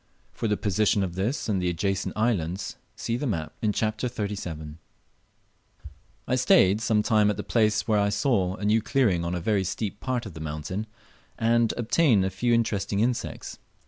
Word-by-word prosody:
For 115 - -3
the 105 -1 +1
position 105 +1 +1
of 90 -3 -3
this 105 +10 -2
and 100 -4 0
the 90 - +1
adjacent 95 +4 -2
islands, 100 -6 -1 0.2
see 115 - -2
the 145 - -2
map 80 -8 -3
in 110 - +2
Chapter 110 +3 -1
XXXVII.] 90 -9 -5 1.5
I - - 0
stayed 110 -5 +4
some 110 -2 +2
time 105 -2 +3
at 105 - -2
a - - -2
place 110 -2 +1
where 110 -2 +3
I 100 0 +2
saw 100 -3 +1
a 105 - -5
new 110 +2 +3
clearing 105 -9 +1
on 85 +1 -2
a - - -2
very 100 +2 +1
steep 100 +2 -3
part 130 -2 -2
of 100 - -8
the 80 - -9
mountain, 80 +7 -4 0.5
and 115 0 +3
obtained 120 - +3
a 95 - -1
few 120 +6 0
interesting 105 -4 +1
insects. 120 +2 -2
105 Hz, 180 wpm, -26 LUFS, 95-115 Hz, 1.5 s, stayed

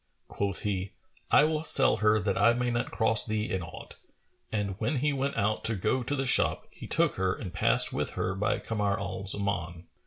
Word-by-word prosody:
Quoth 100 -1 -3
he, 95 -2 -3 0.4
"I - - +5
will 155 0 0
sell 135 -7 +5
her 110 +1 +3
that 100 +1 -1
I 115 - +4
may 125 0 -1
not 120 0 -2
cross 110 -2 +2
thee 110 0 -3
in 95 -2 -1
aught;" 85 -1 -11 0.5
and 105 -2 -2
when 115 +7 -1
he 145 +3 0
went 140 +1 -2
out 105 +2 0
to 110 - +1
go 110 +7 0
to 145 +4 -2
the 135 -1 -2
shop 125 - +2
he - - -11
took - - +1
her 95 0 0
and 95 -6 -8
passed 115 +7 +3
with - - -2
her 90 - -1
by 100 +2 -1
Kamar 105 -2 -2
al 95 -1 -5
Zaman. 90 -4 -2
105 Hz, 210 wpm, -28 LUFS, 95-120 Hz, 0.5 s, I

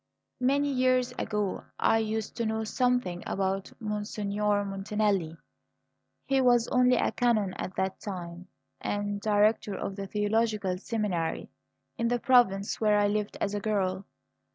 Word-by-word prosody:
"Many 280 +3 +2
years 255 -1 +2
ago 210 -3 -2
I 225 - +3
used 220 -1 -3
to 235 - 0
know 220 0 -1
something 245 -6 0
about 195 0 -1
Monsignor 210 -1 -1
Montanelli. 195 -4 -1 0.9
He 270 -1 +2
was 245 -2 +4
only 250 0 +4
a - - +1
canon 220 -6 +1
at 185 - -6
that 190 0 -2
time, 180 -2 -7 0.3
and 205 0 -2
Director 210 -1 +2
of 195 - -4
the 195 -1 -5
theological 210 -2 0
seminary 200 -7 -2 0.5
in 235 - +1
the 245 +1 +1
province 235 -7 +3
where 210 -1 +4
I 205 - +3
lived 210 0 -2
as 205 - -1
a 205 - -1
girl. 195 -3 -1
210 Hz, 140 wpm, -28 LUFS, 195-230 Hz, 0.9 s, was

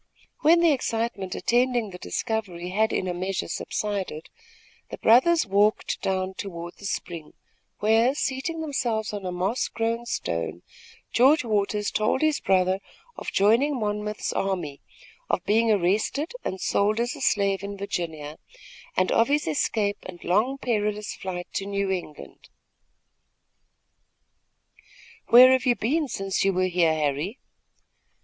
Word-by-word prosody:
When 335 +3 +5
the 335 -2 +5
excitement 225 -7 -2
attending 240 -3 +1
the 180 - -9
discovery 190 -8 -3
had 220 +4 +1
in 185 - -1
a 180 - -1
measure 185 +1 -3
subsided, 195 -6 -4 0.6
the - - -7
brothers 320 +9 +5
walked 205 +1 +1
down 190 0 -1
toward 175 -3 -7
the 200 - -10
spring, 170 -5 -5 0.5
where, 225 +5 +3
seating 290 +5 -2
themselves 235 -8 -2
on 200 -2 -4
a - - -2
moss 185 +7 -1
grown 230 +1 -2
stone, 85 - -3 0.5
George 265 - +5
Waters 210 -2 0
told 215 +4 +1
his 310 -1 +2
brother 185 0 +2 0.4
of - - -6
joining 240 +8 +3
Monmouth's 210 0 -2
army, 175 -8 -2 0.5
of - - 0
being 225 +2 +3
arrested 210 - 0
and 190 - -4
sold 210 +4 +1
as 240 +5 -1
a 285 - -10
slave 200 -5 +1
in 200 0 -6
Virginia, 160 -6 -4 0.6
and 185 0 +2
of 230 - +4
his 295 +2 +1
escape 205 +6 0
and 175 -2 -10
long 220 +9 +1
perilous 210 -4 -1
flight 180 -2 -5
to 195 - -3
New 200 -1 -1
England. 175 -5 -7 2.8
"Where 255 +2 +9
have 260 0 +2
you 245 - +4
been 290 +8 0
since 195 -5 -2
you 195 0 +2
were 185 +1 +1
here, 175 -3 +2
Harry?" 155 - -1
205 Hz, 140 wpm, -25 LUFS, 185-235 Hz, 2.8 s, Where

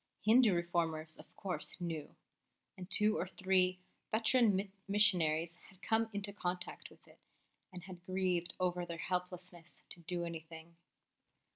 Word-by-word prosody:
Hindu 220 -2 +6
Reformers, 165 -2 -1
of - - -13
course, 185 -1 -3
knew; 165 -4 -4 0.6
and 185 0 -9
two 210 +1 +2
or 180 - -1
three 185 -1 +2 0.3
veteran 220 -3 +3 0.2
missionaries 170 -5 +3
had 190 0 -21
come 225 0 +2
into 205 -1 -4
contact 180 -2 -4
with - - -21
it - - -19 0.5
and 180 -2 -8
had 185 -2 -10
grieved 185 -2 0
over 180 -1 0
their 170 -1 -5
helplessness 180 0 -5
to - - -10
do 175 +1 -3
anything. 165 0 -8
180 Hz, 135 wpm, -35 LUFS, 170-195 Hz, 0.6 s, Hindu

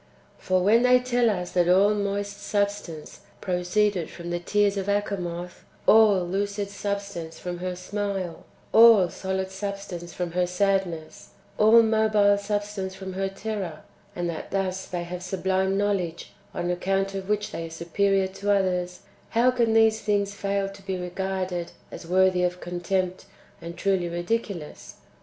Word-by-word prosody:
3. - - -23
For, 185 -1 +3
when 220 +5 +5
they 250 0 +5
tell 245 -1 +2
us 180 -4 -2
that 175 -1 +2
all 195 +3 +5
moist 200 0 -3
substance 200 -6 -3 0.2
pro 180 -2 -1
ceeded 185 -1 +1
from 175 0 -7
the 175 - -1
tears 205 +3 +1
of 195 -1 -3
Achamoth, 180 -4 -3 0.2
all 210 -5 +6
lucid 200 +2 -2
substance 200 -5 -4
from 175 -1 -5
her 180 0 -3
smile, 195 -2 -4 0.3
all 225 -5 +8
solid 190 +1 -3
substance 190 -3 -6
from 180 -2 -4
her 180 +1 +1
sadness, 180 -3 -1 0.3
all 225 +2 +7
mobile 215 -2 +3
substance 205 -2 -3
from 190 -1 -7
her 195 +1 -1
terror, 195 -5 -5 0.3
and 175 0 -2
that 165 -2 -5
thus 190 -1 -2
they 175 -1 -3
have 175 +1 -6
sublime 190 +1 0
knowledge 190 -5 -1 0.2
on 175 -2 -2
account 195 +2 0
of 195 0 -5
which 210 0 0
they 165 - -5
are - - -10
superior 190 +4 +1
to 195 +2 -5
others, 180 -2 0
— - - -32
how 250 +2 +5
can 235 -3 +1
these 225 0 +4
things 200 -1 0
fail 200 -1 -1
to 195 0 -11
be 190 -1 -3
regarded 180 -1 -3 0.2
as 170 - -9
worthy 185 0 +3
of 180 0 0
con 175 0 -5
tempt, 185 0 -1 0.4
and 170 +1 -8
truly 190 -2 0
ridiculous 175 -2 -4
195 Hz, 160 wpm, -25 LUFS, 180-205 Hz, 0.4 s, all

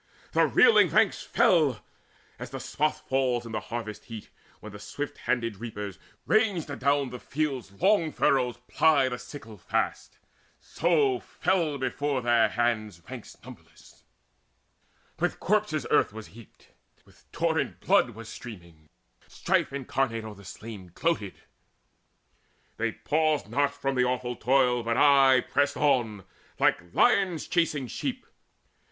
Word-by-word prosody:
The - - +3
reeling 465 - +5
ranks - - +2
Fell, 150 -10 +2 0.6
as - - -7
the - - -6
swath 150 +1 -2
falls 130 -3 0
in 115 - -8
the 110 - -2
harvest 115 -3 -6
heat, 115 -3 -9 0.3
When 105 - -10
the 105 - -10
swift 145 +7 -6
handed 115 -4 -1
reapers, 105 -3 -7 0.3
ranged 205 -9 +1
adown 140 -1 0
The 125 - -7
field's 135 -9 -3
long 170 - +2
furrows, 125 -5 +1
ply 150 -4 +3
the 125 -1 -5
sickle 110 -8 -11
fast; - - -2 0.4
So 145 -7 +1
fell 165 -6 -1
before 130 0 -2
their 120 -1 +3
hands 110 -6 -1
ranks - - -9
numberless: - - -16 1.2
With - - -1
corpses - - 0
earth - - +3
was 110 0 -9
heaped, 115 -1 -17 0.4
with 65 +2 -25
torrent 165 -2 -1
blood 200 -9 +3
Was 115 0 -10
streaming: 85 -10 -11 0.4
Strife - - 0
incarnate 135 -4 -2
o'er 110 -1 -8
the 100 0 -15
slain 100 -1 -10
Gloated. 160 - -2 1.4
They 115 0 -1
paused 155 +4 0
not 145 0 +1
from 135 -1 -3
the 125 -1 +2
awful 125 -1 -2
toil, 125 -1 +2
But 115 0 -1
aye 135 -3 +6
pressed 140 +3 0
on, 120 -9 +1 0.3
like 85 0 +1
lions 180 - +2
chasing 155 -6 0
sheep. 120 - -4
125 Hz, 135 wpm, -27 LUFS, 115-145 Hz, 1.4 s, aye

